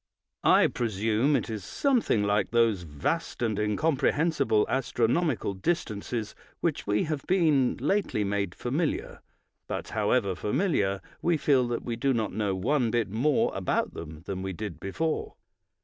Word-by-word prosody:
I - - +6
presume 115 +5 +1
it - - 0
is 110 -4 -5
something 240 - +1
like 105 -1 +1
those 115 -5 +3
vast 85 - -3
and 110 -3 0
incomprehensible 140 +2 +2
astronomical 125 - 0
distances 110 - -2 0.3
with - - -53
which - - -1
we 105 +1 +2
have 155 -3 -2
been 155 -8 +3
lately 150 - 0
made 100 -2 -1
familiar; 145 +6 -2 0.5
but, - - -4
however 105 -1 +1
familiar, 100 - 0 0.2
we 170 -1 +2
feel 135 -4 +3
that 120 -1 -3
we 115 -1 -3
do 135 +1 +1
not 110 -2 -1
know 105 -3 0
one 120 +5 +1
bit 110 -3 0
more 130 +7 +2
about - - -1
them 80 0 -8
than 95 -1 -4
we 95 0 -3
did 90 -4 -6
before. 155 - -2
115 Hz, 150 wpm, -28 LUFS, 100-145 Hz, 0.5 s, I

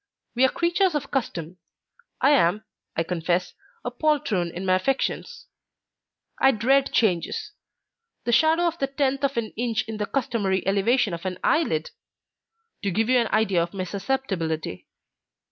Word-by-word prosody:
We 250 - +2
are - - +4
creatures 345 +2 +1
of 280 -1 -3
custom. 180 - -3 0.6
I 270 +3 +5
am, 210 -6 +3 0.3
I 165 - +1
confess, 175 +1 -1 0.3
a 245 - -2
poltroon 245 - 0
in 180 +3 -6
my 185 - +3
affections; 270 - -2 0.9
I 265 - +6
dread 265 +5 +2
changes. 180 -7 0 0.7
The 240 - 0
shadow 320 +7 +4
of 340 0 -1
the 275 - +1
tenth 275 0 -1
of 275 -2 0
an 225 -2 -1
inch 235 0 0
in 220 -1 -5
the 210 -1 -2
customary 210 -8 -1
elevation 205 +2 +2
of 170 - -5
an 185 -1 -4
eyelid! 160 - +1 0.9
to 200 - -1
give 220 +5 0
you 255 -1 +5
an 235 - +1
idea 215 -6 +2
of 170 +3 -4
my 185 - -2
susceptibility. 185 - -3
225 Hz, 155 wpm, -25 LUFS, 185-270 Hz, 0.9 s, I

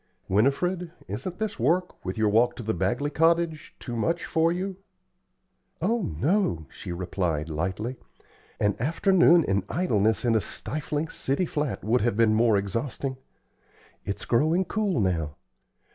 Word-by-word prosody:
"Winifred, 165 - +1 0.2
isn't 180 -2 -5
this 220 -9 -3
work, 170 +9 0
with 95 +2 -4
your 110 -1 +3
walk 120 +3 +3
to 120 - -7
the 110 +1 -1
Bagley 120 - -1
cottage, 165 -1 +1
too 120 - -6
much 165 +9 0
for 165 +1 +2
you?" 185 +2 -3 1.0
"Oh, 235 +1 +1 0.2
no," 150 - +1
she - - -8
replied, 85 -3 -2
lightly. 95 +10 -3 0.6
"An 105 -1 +2
afternoon 170 - +4
in 100 -5 0
idleness 110 - +1
in 120 - +3
a 110 - +3
stifling 150 +8 -3
city 140 +5 -1
flat 150 -4 -2
would 120 +4 +2
have 110 -1 0
been 115 -2 +4
more 110 -1 +4
exhausting. 115 +7 -3 0.9
It's 100 - -4
growing 155 +9 +2
cool 200 - 0
now. 80 -7 0
125 Hz, 145 wpm, -26 LUFS, 105-170 Hz, 1.0 s, afternoon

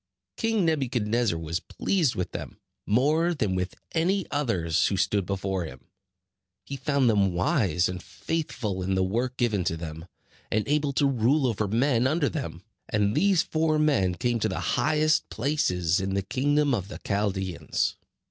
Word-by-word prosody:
King 225 -4 +1
Nebuchadnezzar 120 - +1
was 80 +1 -3
pleased 165 - 0
with 90 - -3
them, - - -7 0.3
more 155 +10 +2
than 105 -10 0
with 90 0 -2 0.2
any 185 +4 +1
others 95 - +1
who 100 - -1
stood 95 0 +1
before 95 -2 -2
him. - - -11 0.8
He 140 - -5
found 135 -1 +1
them 100 -5 +3
wise 90 -1 +2
and 90 -1 -5
faithful 115 - -3
in 95 +1 0
the 95 - +2
work 120 +7 -1
given 110 -6 +1
to 80 - 0
them, 80 +1 -7 0.4
and 110 0 0
able 145 0 +1
to 140 - +2
rule 135 +2 +2
over 110 -4 0
men 120 +3 +2
under 150 +1 +1
them. 135 - -5 0.3
And 105 0 +1
these 195 -3 +3
four 155 -1 +1
men 135 -13 +2
came 120 +6 0
to - - 0
the - - -3
highest 155 0 +2
places 105 - 0
in 95 0 -2
the 100 - 0
kingdom 145 +6 +1
of 100 -5 -1
the 105 - -8
Chaldeans. 95 -3 -1
115 Hz, 165 wpm, -26 LUFS, 95-145 Hz, 0.8 s, them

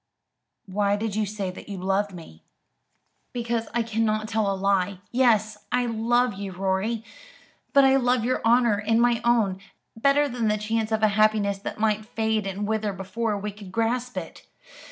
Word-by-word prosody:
"Why 200 +1 +1
did 210 0 -3
you 215 -1 0
say 200 -2 -3
that 185 - -12
you 200 - -5
loved 195 +2 0
me?" 165 - -12 0.9
"Because 235 -1 -2
I 235 +1 0
cannot 215 -1 0
tell 215 -2 0
a - - -1
lie. 195 0 +1
Yes, 220 -4 +2
I 245 0 +2
love 240 +1 +1
you, 195 0 -6
Rorie; 195 +5 -1 0.7
but 275 -1 +6
I 270 0 +5
love 250 -2 +1
your 255 - 0
honour, 235 -2 +4
and 225 +2 +1
my 240 -1 +3
own, 220 -6 +2 0.4
better 275 +5 +3
than 240 -4 -2
the 210 0 +2
chance 220 +1 -1
of 220 0 0
a 215 - +6
happiness 210 -1 +2
that 200 - -6
might 215 -1 +1
fade 220 -2 -1
and 200 +2 -3
wither 215 -2 -1
before 205 +3 -2
we 210 +1 -4
could 200 -2 -12
grasp 240 +4 -1
it. - - -7
215 Hz, 175 wpm, -25 LUFS, 200-235 Hz, 0.9 s, but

